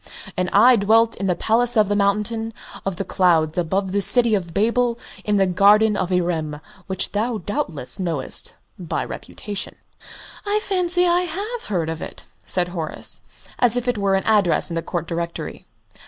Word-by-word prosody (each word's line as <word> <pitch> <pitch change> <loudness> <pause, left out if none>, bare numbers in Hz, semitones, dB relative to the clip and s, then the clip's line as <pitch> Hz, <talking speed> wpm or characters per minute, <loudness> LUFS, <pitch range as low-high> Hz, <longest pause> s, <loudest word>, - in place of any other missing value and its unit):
And 180 -1 -1
I 240 +5 +6
dwelt 225 +3 +3
in 195 - -2
the 180 - +2
Palace 230 +5 +1
of 215 -2 +5
the 205 - 0
Mountain 210 +3 0 0.3
of 195 - -1
the 195 - -4
Clouds 165 -5 +2
above 190 +2 -1
the 200 +1 +1
City 235 +2 +4
of 180 -5 -1
Babel 235 +5 +1 0.3
in 210 -1 +1
the 195 - +4
Garden 205 +4 +4
of 185 -2 -1
Irem, 165 -4 -1 0.3
which 190 -1 -1
thou 220 +3 -1
doubtless 195 - -3
knowest 165 -7 -3 0.2
by 175 -3 -2
repute?" 205 -2 -6 0.8
"I 415 +1 +1
fancy 360 -2 +2
I 350 0 +3
have 410 +8 -4
heard 175 -6 -1
of 160 -1 -4
it," - - -8 0.2
said 180 -1 -1
Horace, 165 -3 -4 0.4
as 245 -1 +3
if 245 0 -2
it 245 -4 0
were 195 -1 +2
an 190 - 0
address 205 -6 +3
in - - -3
the 165 - -1
Court 170 -1 -3
Directory. 170 0 -5
200 Hz, 175 wpm, -22 LUFS, 175-230 Hz, 0.8 s, I